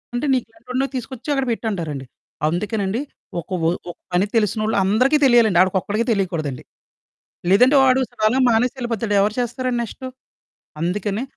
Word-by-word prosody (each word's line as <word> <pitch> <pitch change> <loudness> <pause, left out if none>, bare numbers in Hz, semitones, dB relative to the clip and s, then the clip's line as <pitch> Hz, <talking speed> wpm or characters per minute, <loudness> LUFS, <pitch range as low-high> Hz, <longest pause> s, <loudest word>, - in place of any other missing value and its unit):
అంటే 245 - -1
నీకెంటోడినో 250 +2 -2
తీసుకొచ్చి 255 +2 -6
అక్కడ 270 -1 0
పెట్టంటారండి. 170 - -3 0.4
అందుకేనండి 200 +4 -1 0.4
ఒక 170 - -9 0.2
ఓ - - +4 0.2
ఒక - - -17 0.2
పని 180 +3 +3
తెలిసినోళ్ళు 215 0 +1
అందరికి 250 +10 +3
తెలియాలండి. 230 -8 +5
ఆడికొక్కడికే 200 +4 0
తెలీకూడదండి. 170 - -2 0.9
లేదంటే, 250 +8 +6
వాడు 260 0 +4
సడన్‌గా 230 +2 +1
మానేసెళ్ళిపోతాడు, 230 -2 0
ఎవరు 205 +1 +1
చేస్తారండి 245 +1 -2
నెక్స్టు. 260 +3 -7 0.8
అందుకనే 205 +5 -1
220 Hz, 120 wpm, -21 LUFS, 195-250 Hz, 0.9 s, లేదంటే